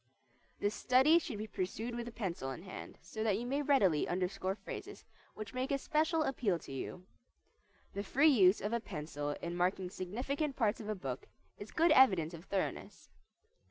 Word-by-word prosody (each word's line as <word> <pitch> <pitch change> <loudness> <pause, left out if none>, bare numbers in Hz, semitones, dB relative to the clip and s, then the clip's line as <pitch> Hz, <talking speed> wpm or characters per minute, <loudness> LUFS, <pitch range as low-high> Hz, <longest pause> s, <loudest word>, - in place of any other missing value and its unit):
This 205 +1 0
study 265 +9 +5
should 260 -9 -5
be 215 - -4
pursued 220 +4 -3
with 240 0 -5
pencil 175 - -3
in 135 +6 -6
hand, 190 - -9
so 220 - -4
that 210 -3 +2
you 235 - -4
may 275 +4 0
readily 205 - +3
underscore 185 +1 -1
phrases - - -8 0.3
which 215 +1 -7
make 255 +1 -2
a 280 - +2
special 315 +3 +1
appeal 235 - 0
to 160 - -11
you. 175 +6 -6 0.9
The 200 - -2
free 280 +9 +4
use 195 -6 +5
of 210 +3 -2
a 235 - +2
pencil 150 -7 -4
in 170 0 -3
marking 180 +1 0
significant 265 - -2
parts 225 -4 +1
of 215 -2 -6
a 215 - 0
book 135 -9 -5 0.3
is 205 - -8
good 330 0 +3
evidence 190 - +5
of 170 +2 -9
thoroughness. 195 -2 -3
210 Hz, 180 wpm, -34 LUFS, 180-260 Hz, 0.9 s, study